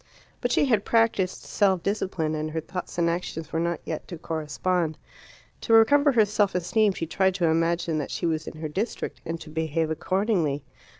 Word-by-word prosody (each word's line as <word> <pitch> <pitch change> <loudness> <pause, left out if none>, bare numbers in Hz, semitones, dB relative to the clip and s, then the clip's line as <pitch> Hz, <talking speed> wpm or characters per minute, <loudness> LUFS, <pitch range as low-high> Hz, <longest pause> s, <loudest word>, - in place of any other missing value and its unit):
But 245 - 0
she 285 - +3
had 225 -7 +2
practised 225 -5 +1
self 190 -4 +1
discipline, 185 -6 -1
and 155 0 -2
her 160 +1 -2
thoughts 180 +3 -6
and 170 -1 +2
actions 170 -2 -3
were 160 - +1
not 170 0 -1
yet 160 - -5
to 175 - -7
correspond. 160 +1 -1 0.6
To 225 - +1
recover 285 +6 +6
her 220 -3 +5
self 205 -2 +1
esteem 200 +4 +2
she 165 - -3
tried 190 +3 +1
to 180 -3 +1
imagine 165 0 +1
that 145 - -4
she - - -3
was 160 -2 -1
in - - -7
her 155 - -2
district, 195 +10 -4
and 165 0 -3
to 155 - -10
behave 160 0 -1
accordingly. 175 -4 0
170 Hz, 190 wpm, -26 LUFS, 160-200 Hz, 0.6 s, recover